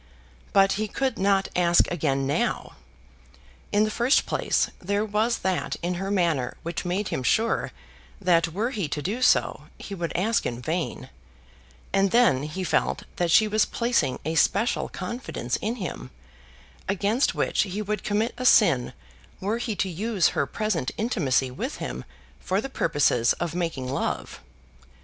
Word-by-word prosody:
But 195 0 +5
he 215 - 0
could 260 +1 -2
not 195 0 +2
ask 175 -1 +4
again 140 -5 0
now. 140 - -1 1.0
In 205 +1 +3
the 215 - 0
first 245 +6 +3
place, - - 0
there 205 +3 -1
was 220 +3 +1
that 185 -1 0
in 175 +1 0
her 195 - -3
manner 170 -10 0
which 170 +1 -4
made 185 +3 -1
him - - -2
sure 220 - +1 0.5
that 175 -3 +3
were 210 +9 -2
he 205 - -2
to 150 0 -3
do 220 +7 -2
so, - - +2
he 200 - -8
would 170 -3 -3
ask 220 +6 +1
in 120 -1 -4
vain; 160 +6 -3 0.8
and 195 0 +3
then 230 - +4
he 155 +6 -4
felt - - 0
that 175 -1 +1
she 215 +6 +5
was 215 0 +2
placing 235 - 0
a 160 - -1
special 200 +8 +2
confidence 185 - -4
in 220 +3 -2
him, 175 - -6 0.8
against 205 +6 +1
which - - +1
he 200 0 -3
would 210 +1 -3
commit 215 +3 0
a 255 - -3
sin 135 - +4 0.5
were 205 +4 -1
he 235 -3 -2
to 195 - 0
use 195 +2 +1
her - - -1
present 210 - -1
intimacy 145 - +1
with 125 - -4
him 65 0 -6 0.3
for 190 +2 -1
the 270 - -4
purposes 145 - +2
of 170 -2 -4
making 165 -7 -2
love. 135 +2 -3
190 Hz, 160 wpm, -25 LUFS, 165-215 Hz, 1.0 s, But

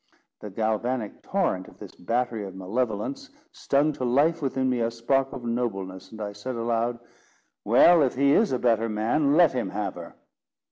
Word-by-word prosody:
The 105 - -8
galvanic 110 +2 -2
torrent 175 - -1
of - - -16
this - - -11
battery 115 +2 -2
of 95 -1 -9
malevolence 115 - -3 0.2
stung 145 +2 +1
to 130 - -6
life 145 +7 +2
within 130 -2 -1
me 125 -1 0
a 115 0 +1
spark 135 +4 0
of 125 - -8
nobleness, 95 -6 -3
and 110 - -11
I 105 -1 -4
said 125 +5 -6
aloud, 115 +1 -1 0.7
"Well, 175 -2 +6
if 135 -3 +1
he 140 +2 +3
is 220 +5 +3
a 130 - +1
better 115 -2 +1
man, 130 +8 +1
let 175 -4 +6
him 125 - -2
have 100 -3 -3
her." 85 -1 -10
120 Hz, 180 wpm, -26 LUFS, 105-135 Hz, 0.7 s, Well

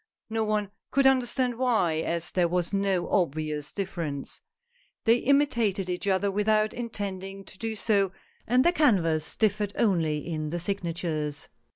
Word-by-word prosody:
No 225 0 +1
one 210 -2 -1 0.2
could 275 0 +2
understand 255 -2 +2
why, 220 -11 +2
as 170 +1 -2
there 180 -2 +2
was 175 +2 -1
no 195 -2 +1
obvious 155 -5 -1
difference. 170 -8 -4 0.6
They 230 +1 +5
imitated 235 -9 +2
each 180 +3 -3
other 195 +1 +2
without 215 +1 +2
intending 195 -4 -5
to - - -13
do 225 -1 -3
so, 200 -3 +1 0.4
and 250 +3 +3
their 345 - +6
canvas 170 - +2
differed 210 -1 +1
only 165 -9 +1
in 155 -2 -3
the 175 - -2
signatures. 170 -5 -2
195 Hz, 145 wpm, -27 LUFS, 170-220 Hz, 0.6 s, their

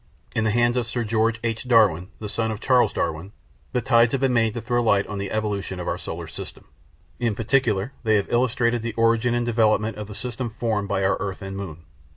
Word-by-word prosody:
In 110 - +1
the - - +3
hands 120 +2 +2
of 120 -2 0
Sir 120 +1 -2
George 110 +1 +1
H. 115 +1 -2
Darwin, 105 -8 +4
the 105 - -6
son 110 +2 -1
of 110 -2 -4
Charles 125 0 +3
Darwin, 85 +4 -3 0.4
the 125 - 0
tides 115 0 +4
had 135 - 0
been 135 -2 +2
made 115 -1 +2
to - - -2
throw 120 +2 0
light 100 -4 +3
on 105 -1 -5
the 100 0 -3
evolution 100 -3 -2
of 90 - -5
our - - -1
solar - - -6
system. - - -9 0.5
In 115 -4 0
particular, 115 -1 +1
they 110 -2 +2
have 100 - +2
illustrated 120 -1 +2
the 115 0 -4
origin 115 +1 +2
and 120 0 0
development 110 -2 +2
of 105 -1 -6
the 105 - -9
system 120 -1 -4
formed 110 -4 0
by 95 -2 0
our 95 - +2
earth 95 0 -4
and 95 0 -6
moon. 85 -5 -7
110 Hz, 225 wpm, -24 LUFS, 100-120 Hz, 0.5 s, Darwin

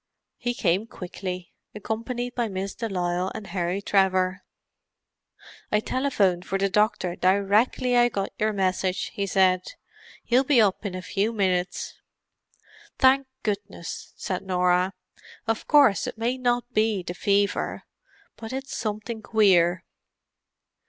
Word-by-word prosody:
He 245 0 -2
came 190 +3 +1
quickly, 180 -2 -7 0.2
accompanied 235 +4 -4
by 240 -2 -1
Miss 195 -1 -4
de 230 -1 -4
Lisle 180 -1 -1
and 210 - -6
Harry 185 +1 -2
Trevor. 185 -1 +2 1.3
"I 210 - +3
telephoned 210 -8 +1
for 195 +1 -2
the 195 0 0
doctor 210 -4 +1
directly 205 +7 +2
I 240 0 +5
got 195 -3 -3
your 215 +1 +2
message," 185 -2 -1
he 200 -1 -2
said. 185 -1 +2 0.5
"He'll 250 +2 +3
be 270 -2 +4
up 205 -1 +2
in 185 - -6
a 185 - -6
few 205 +4 0
minutes." 185 -4 -1 1.0
"Thank 265 0 +4 0.2
goodness!" 200 -4 -5
said 185 - -3
Norah. 180 0 +1 0.5
"Of 225 -1 -2
course 280 -9 +5
it - - -6
may 235 +3 0
not 245 0 0
be 215 -3 +1
the 175 - -5
fever. 200 +2 0 0.5
But 225 +2 -7
it's 270 +1 -5
something 220 +1 -4
queer." 185 -6 +3
200 Hz, 130 wpm, -25 LUFS, 185-230 Hz, 1.3 s, I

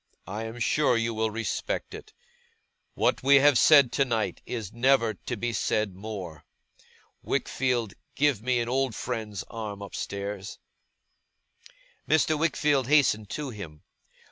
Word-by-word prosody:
I 105 +5 -5
am 115 +1 -7
sure 125 +2 +2
you 115 0 -1
will 110 0 0
respect 110 -1 -3
it. - - -10 0.8
What - - +1
we 140 +2 +5
have 140 0 +6
said 140 +1 +6
tonight 120 -6 0
is 110 -6 -5
never 120 -2 +3
to 120 - -6
be 120 +2 -2
said 105 -1 0
more. 95 -6 -7 0.8
Wickfield, 120 -5 -1 0.2
give 140 -6 +2
me 125 +1 +1
an 115 - -3
old 130 -2 0
friend's 110 -6 -4
arm 105 -3 -7
upstairs!' 100 0 -5 1.5
Mr. 155 0 +3
Wickfield 150 -4 +1
hastened 125 -8 +3
to 145 -3 -4
him. 85 -9 -10
115 Hz, 130 wpm, -27 LUFS, 105-135 Hz, 1.5 s, have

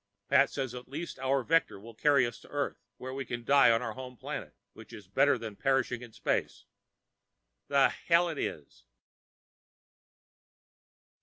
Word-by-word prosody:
Pat - - +5
says 130 -3 -4
at 125 0 -8
least 155 0 -6
our 135 0 +1
vector 155 -9 +1
will 115 +3 -12
carry 140 +2 +3
us 120 - -6
to - - -17
Earth 145 -1 -3 0.2
and 130 +1 -6
we 135 - -3
can 120 -1 -5
die 140 +2 +6
on 115 +1 +3
our 115 -3 -3
home 125 +1 -9
planet, - - -6 0.2
which - - -14
is - - -11
better - - +3
than 110 -3 -7
perishing 135 -1 0
in 120 -2 -10
space. - - -2 1.0
The 140 -1 +4
hell 170 +1 +2
it 160 -4 -4
is. 70 -5 -6
130 Hz, 160 wpm, -30 LUFS, 120-140 Hz, 1.0 s, die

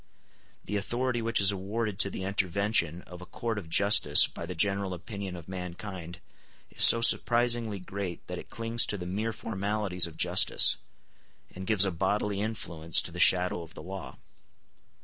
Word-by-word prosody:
The 105 - -3
authority 120 +4 -3
which 115 0 0
is 100 0 +4
awarded 100 +2 -5
to 100 - +3
the 95 - -7
intervention 95 -3 -1
of 90 0 -13
a - - -10
court 115 -3 -5
of 85 -5 -12
justice 100 +5 +5
by 85 - -9
the 90 - -6
general 100 +2 0
opinion 95 +1 -8
of 85 -2 -11
mankind 90 -1 -8 0.5
is - - -3
so 115 - +8
surprisingly 120 -2 +3
great 95 -1 -7
that - - -7
it - - -13
clings 115 0 0
to 105 - -3
the 90 - -8
mere 105 +5 -3
formalities 100 -4 -1
of 80 -1 -14
justice, - - +4 0.8
and 95 0 -9
gives 105 -3 +3
a 95 - -2
bodily 100 +3 -2
influence 85 -7 0
to - - -7
the - - -9
shadow 90 -1 +4
of 80 -1 -13
the - - -10
law. 95 +1 -9
100 Hz, 170 wpm, -27 LUFS, 90-110 Hz, 0.8 s, so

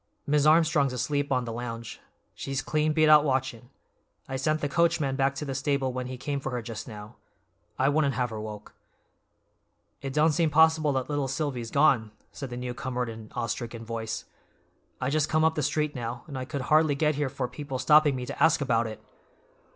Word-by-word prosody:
"Mis' 150 0 +3
Armstrong's 155 -4 +4
asleep 140 +3 -1
on 125 -2 +1
the 115 - -5
lounge. 115 -1 -6 0.3
She's 135 -1 -4
clean 155 +1 +1
beat 155 0 +3
out 150 -1 +7
watchin'. 130 -4 -2 0.6
I 135 - -4
sent 155 +4 0
the 145 - -1
coachman 155 -3 +1
back 135 0 +1
to 150 - -4
the 135 - -3
stable 135 -1 0
when 125 0 -4
he 130 0 -6
came 140 +2 -3
for 135 - -4
her 125 - -2
just 115 -1 -7
now; 105 -2 -10 0.6
I 130 - +2
wouldn't 140 -2 +2
have 125 -1 -1
her 110 -1 -5
woke." 105 -1 -8 1.3
"It 135 - -4
don't 155 +3 +3
seem 165 +1 +2
possible 160 0 +4
that 130 -1 -1
little 145 -2 -1
Silvy's 130 -4 -3
gone," 125 -8 +3 0.2
said 135 - -7
the 120 - -6
newcomer 125 0 -3
in 120 - -4
an 110 -1 -9
awestricken 115 -1 -4
voice. 115 -1 -4 0.7
"I 125 - -1
just 155 0 +1
come 155 0 +2
up 160 - +3
the 155 - -2
street 150 +1 0
now, 120 -1 -5
and 145 - -9
I 130 -1 -4
could 140 +1 -4
hardly 155 +2 +3
get 150 +1 +2
here 145 -1 -1
for 130 -2 -3
people 140 -1 -6
stopping 150 +2 +5
me 125 -1 -4
to - - -2
ask 160 0 +5
about 120 -5 +1
it. 110 - -9
135 Hz, 205 wpm, -27 LUFS, 125-150 Hz, 1.3 s, out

